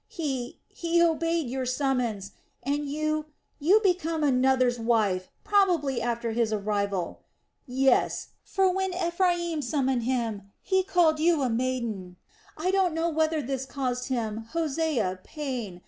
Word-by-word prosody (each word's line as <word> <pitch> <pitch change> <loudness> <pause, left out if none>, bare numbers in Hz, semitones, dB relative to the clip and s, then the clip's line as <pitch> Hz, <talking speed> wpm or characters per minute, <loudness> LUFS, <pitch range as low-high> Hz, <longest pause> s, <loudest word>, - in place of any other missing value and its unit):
He, 275 - -4
he 340 0 0
obeyed 330 -2 +2
your 260 +1 -3
summons. 250 -7 -1 0.3
And 285 +2 -1
you... 310 +1 -1 0.3
you 360 +9 +5
became 330 -4 +1
another's 255 -2 +3
wife; 215 -6 +1
probably 345 - +2
after 235 0 -1
his 225 -1 +1
arrival... 200 -3 -1 0.5
yes! 265 +1 +2
For 385 -1 +2
when 380 -1 -1
Ephraim 345 -2 0
summoned 265 -2 0
him, 225 -6 -2
he 380 -1 +2
called 345 -4 +3
you 320 -2 +3
a 255 - +1
maiden... 225 -7 -2 0.4
I 355 +4 0
don't 380 -4 +2
know 330 +1 +1
whether 315 -1 +1
this 265 +1 -3
caused 250 -2 -2
him, 225 -3 -2
Hosea, 300 - 0
pain.... 250 - -5
270 Hz, 130 wpm, -27 LUFS, 235-330 Hz, 0.5 s, you